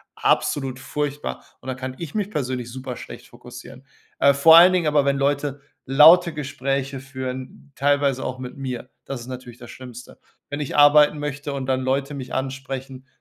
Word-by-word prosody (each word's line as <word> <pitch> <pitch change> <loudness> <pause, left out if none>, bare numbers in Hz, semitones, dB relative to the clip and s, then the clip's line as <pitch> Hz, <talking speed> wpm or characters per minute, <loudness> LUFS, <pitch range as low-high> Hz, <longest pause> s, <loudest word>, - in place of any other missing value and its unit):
absolut 135 -3 0
furchtbar, 145 +1 -4 0.2
und - - -14
dann 130 -1 -4
kann 130 0 -6
ich 165 -4 -7
mich 205 -2 -2
persönlich 130 - -3
super 130 0 -7
schlecht - - -11
fokussieren. 125 +2 -13 0.3
Äh, 140 - +5
vor 160 +4 +7
allen 180 +2 +8
Dingen 175 -3 +1
aber, 150 -2 +2
wenn 140 0 +2
Leute 140 0 -1 0.2
laute 160 +5 +6
Gespräche 140 -2 -3
führen, 130 +1 -8
teilweise 140 -1 +1
auch 130 - -4
mit 130 0 -8
mir. 130 -2 -6 0.2
Das 135 -3 -6
ist 120 - -11
natürlich 125 -2 -9
das 120 -1 -11
Schlimmste. 125 -1 -12 0.3
Wenn 145 - -4
ich 145 - -4
arbeiten 150 +1 +6
möchte 145 0 -4
und 135 -1 -4
dann 130 -1 +1
Leute 135 +2 -1
mich 130 -2 -8
ansprechen, 135 0 -5
135 Hz, 175 wpm, -22 LUFS, 130-145 Hz, 0.3 s, allen